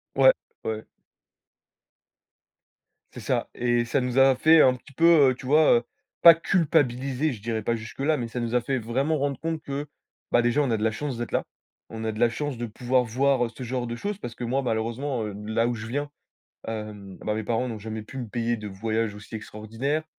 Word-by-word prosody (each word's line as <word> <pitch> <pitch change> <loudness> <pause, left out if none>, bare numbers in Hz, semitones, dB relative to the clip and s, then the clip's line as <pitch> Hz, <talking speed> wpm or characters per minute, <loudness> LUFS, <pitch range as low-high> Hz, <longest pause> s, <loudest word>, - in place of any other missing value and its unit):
Ouais, - - +7 0.3
ouais. 110 0 -3 2.3
C'est - - -8
ça, - - -1
et 120 0 +1
ça 120 - 0
nous 125 0 -2
a 135 0 +6
fait 160 0 +6
un 130 - +6
petit 135 +2 -13
peu, 160 -4 +6
heu, - - -3
tu 130 - -12
vois? 150 +3 +5
Heu, - - -13 0.4
pas 170 - +11
culpabiliser, 145 -5 +1
je 110 - -10
dirais 110 0 -2
pas 115 +2 0
jusque 110 +2 -9
là, 150 +3 +2
mais 120 -3 -4
ça 125 - -4
nous 120 0 -2
a 125 - +3
fait 130 +2 -1
vraiment 135 +8 0
rendre 140 0 -1
compte 160 -1 -3
que, 140 +1 -4 0.5
bah, 120 - +5
déjà 120 +5 +2
on 135 -4 0
a 110 - +2
de 105 - -3
la 110 - +2
chance 130 +2 -4
d'être 120 - -5
là. - - +1 0.5
On 110 0 -6
a 110 - -1
de 110 - -7
la 120 - +5
chance 145 +1 -4
de 120 - -3
pouvoir 125 +3 +1
voir 125 +1 +1
ce 130 - -8
genre 125 0 -2
de 120 0 -5
choses, 205 +7 -3
parce 120 - -7
que 120 0 -5
moi 130 +4 0
malheureusement, 120 +2 -2
heu, 105 - -5
là 115 +2 +1
où 120 - -1
je 110 0 -7
viens, 145 +4 -3 0.6
hem, 105 -3 -7
bah, 105 - -2
mes 110 - -3
parents 120 +3 -1
n'ont 110 -3 -5
jamais 110 +1 -5
pu 120 +5 -10
me 125 -3 -4
payer 120 +1 -1
de 105 -2 -7
voyages 110 +2 -2
aussi 105 +2 -10
extraordinaires. 115 +8 -3
120 Hz, 225 wpm, -26 LUFS, 110-140 Hz, 2.3 s, pas